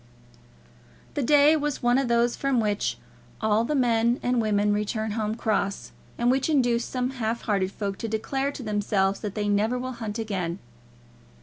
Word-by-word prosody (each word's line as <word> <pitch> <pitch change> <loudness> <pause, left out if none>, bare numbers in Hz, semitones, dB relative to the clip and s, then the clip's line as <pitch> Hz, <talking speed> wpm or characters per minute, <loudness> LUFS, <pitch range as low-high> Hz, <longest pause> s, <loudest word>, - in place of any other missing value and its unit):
The - - -1
day 290 +4 +5
was 295 -3 -2
one 245 +2 +4
of 270 - 0
those 235 0 +2
from 275 -3 0
which 210 -2 0 0.4
all 220 0 +2
the 295 +6 -1
men 235 -2 +2
and 245 -1 +2
women 210 -1 +2
return 215 +1 -2
home 215 0 -2
cross, 200 -3 -1 0.3
and 240 +1 +3
which 265 +3 +1
induce 245 -5 +2
some 255 0 -2
half 235 -3 -2
hearted 195 -3 0
folk 200 -2 -4
to 230 - -3
declare 270 +6 -1
to 260 - -7
themselves 205 -2 0
that 205 -3 -5
they 210 -1 -1
never 210 +4 +1
will 255 +1 -4
hunt 225 -3 -5
again. 190 -6 -3
225 Hz, 175 wpm, -26 LUFS, 210-250 Hz, 0.4 s, day